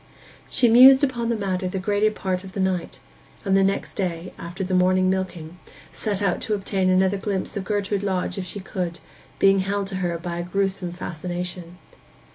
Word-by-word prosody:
She 250 - +3
mused 260 +4 +8
upon 240 -4 0
the 235 - +1
matter 190 -3 -2
the 180 - -3
greater 205 +2 +2
part 190 -3 -3
of 190 -1 -10
the 195 - -4
night; 185 -2 -1 0.5
and 195 - +3
the 195 - +5
next 195 +1 -1
day, 180 -2 -3
after 175 +3 -6
the 185 0 -3
morning 185 0 +3
milking, 180 -3 -4 0.3
set 205 -2 -2
out 195 -3 0
to 215 - 0
obtain 195 -1 0
another 190 +1 +3
glimpse 195 -2 -3
of 195 -2 -3
Gertrude 205 -1 -1
Lodge 190 -1 -2
if 185 - -4
she 205 - -5
could, 180 -3 -4 0.4
being 195 0 +5
held 200 +1 -1
to 190 - -4
her 175 -2 -1
by 170 0 -5
a - - -2
gruesome 190 -1 -2
fascination. 175 0 -6
190 Hz, 190 wpm, -23 LUFS, 180-200 Hz, 0.5 s, mused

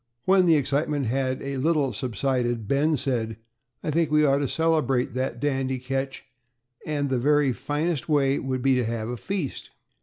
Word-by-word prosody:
When 185 -1 +4
the 165 - +6
excitement 145 0 0
had 130 +2 -1
a 140 0 -3
little 145 -1 +1
subsided, 120 -2 -1
Ben 150 +5 +2
said, 120 -5 -1 0.5
"I 155 - -1
think 165 0 +1
we 150 0 +4
ought 140 0 +3
to 140 - 0
celebrate 155 -5 +1
that 130 -1 -2
dandy 135 -1 -1
catch, 135 +1 -4 0.6
and 145 -2 -1
the 130 - +1
very 145 0 +3
finest 150 - -2
way 140 -2 +2
would 130 -2 -3
be 135 -1 +4
to 125 -1 +2
have 115 0 -3
a 125 - -3
feast." 180 - -4
135 Hz, 175 wpm, -25 LUFS, 130-150 Hz, 0.6 s, the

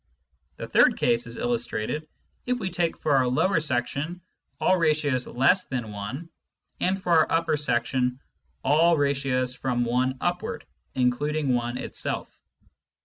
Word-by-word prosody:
The - - -7
third - - +4
case 120 0 +1
is 115 - -7
illustrated 160 - -2 0.4
if 250 0 +1
we 190 -6 -3
take 170 -2 0
for 145 -2 +1
our 130 -1 +3
lower 160 +8 +2
section 150 +3 -2 0.4
all 185 - +4
ratios 150 -6 +1
less 160 +10 +3
than 120 -5 -4
1, 105 +11 -6 0.5
and 190 +2 +1
for 180 -2 -3
our 160 -2 +4
upper 165 -1 +2
section 125 -2 0 0.4
all 165 +4 +4
ratios 135 -3 0
from 125 -1 -1
1 130 +2 0
upward 175 0 -2 0.3
(including 135 +3 +1
1 120 0 -1
itself). - - -3
140 Hz, 140 wpm, -26 LUFS, 125-165 Hz, 0.5 s, third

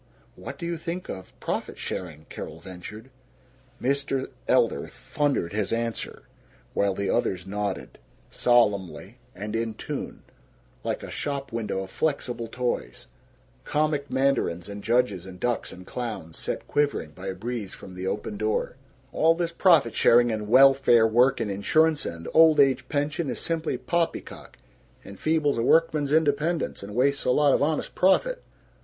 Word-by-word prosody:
"What - - -8
do 170 - -6
you 170 0 -2
think 170 +2 -5
of 95 -1 -8
profit - - -3
sharing?" 80 -4 -6
Carol 80 - -7
ventured. 100 +7 -10 0.7
Mr. 135 0 -1 0.2
Elder - - +2
thundered 100 - -2
his 105 -1 -1
answer, 115 0 -3 0.5
while 100 -1 +1
the 100 0 -2
others 90 -1 0
nodded, 100 0 -4 0.3
solemnly 105 -2 +1 0.2
and 105 +3 -5
in 115 -1 -2
tune, - - -6 0.6
like - - -3
a - - -7
shop 140 -1 -3
window 110 -4 -2
of 95 - -11
flexible 125 -6 -2
toys, 125 +2 -3 0.6
comic 150 -2 0
mandarins 130 -11 0
and 100 0 -7
judges 110 -6 +1
and 90 -1 -10
ducks 120 +2 -1
and 90 0 -11
clowns, 105 -10 -5
set - - -4
quivering 145 - 0
by 90 +5 -9
a 95 - -3
breeze 110 0 -5
from 95 - -11
the 90 +1 -5
open 105 +2 -3
door: 110 +4 -1 0.4
"All 165 +1 +4
this 170 -1 -1
profit 165 - +4
sharing 120 0 +5
and 105 -1 -3
welfare 135 -1 +6
work 125 +4 +4
and 110 -3 -1
insurance 155 +10 +2
and 85 -1 -7
old 160 -2 +6
age 130 -2 +3
pension 145 +1 -1
is - - -3
simply 165 -1 -1
poppycock. 170 -1 -3 0.5
Enfeebles 145 +6 0
a - - +2
workman's 155 +1 +3
independence 155 +2 +1
and 100 +1 -8
wastes 140 +3 +2
a - - 0
lot 145 +2 +4
of - - +2
honest 150 +1 0
profit. - - +2
120 Hz, 150 wpm, -26 LUFS, 100-145 Hz, 0.7 s, welfare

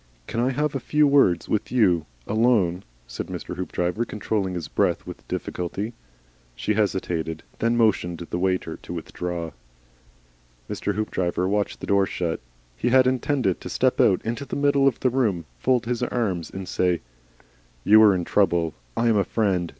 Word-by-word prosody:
"Can 115 - -3
I 125 +2 +2
have 150 +3 0
a 135 - -1
few 150 +4 +2
words 135 - +4
with 105 - -1
you, 90 -10 +3 0.2
alone?" 105 -6 +2 0.2
said - - -6
Mr. - - -6
Hoopdriver, 90 +3 -1
controlling 105 -4 -2
his 85 -3 -4
breath - - 0
with - - -10
difficulty. 100 +6 -4 0.6
She 85 - -1
hesitated, 90 -6 -1
and - - -30
then 115 +1 +1
motioned 100 -6 +2
the 85 +1 -5
waiter 95 0 -1
to - - -9
withdraw. 85 0 -4 1.2
Mr. 105 - -2
Hoopdriver 95 -4 -1
watched 105 +1 -1
the - - -4
door 100 -1 +3
shut. 85 -2 -2 0.4
He 120 - 0
had 130 +1 +5
intended 130 - +1
to - - -6
step - - +2
out 95 - +3
into 120 +5 -2
the - - -5
middle 140 -1 +3
of 130 - +1
the 130 - +2
room, 105 -10 0
fold 125 - +2
his 120 0 -2
arms 105 -9 -1
and 95 -1 -7
say, 90 -2 +1 0.8
"You 110 - +7
are 105 -3 +7
in 90 -2 -2
trouble. 85 -5 +2 0.2
I 120 - +2
am 110 -2 +4
a 100 - +3
Friend. 95 -7 0
100 Hz, 175 wpm, -24 LUFS, 90-120 Hz, 1.2 s, You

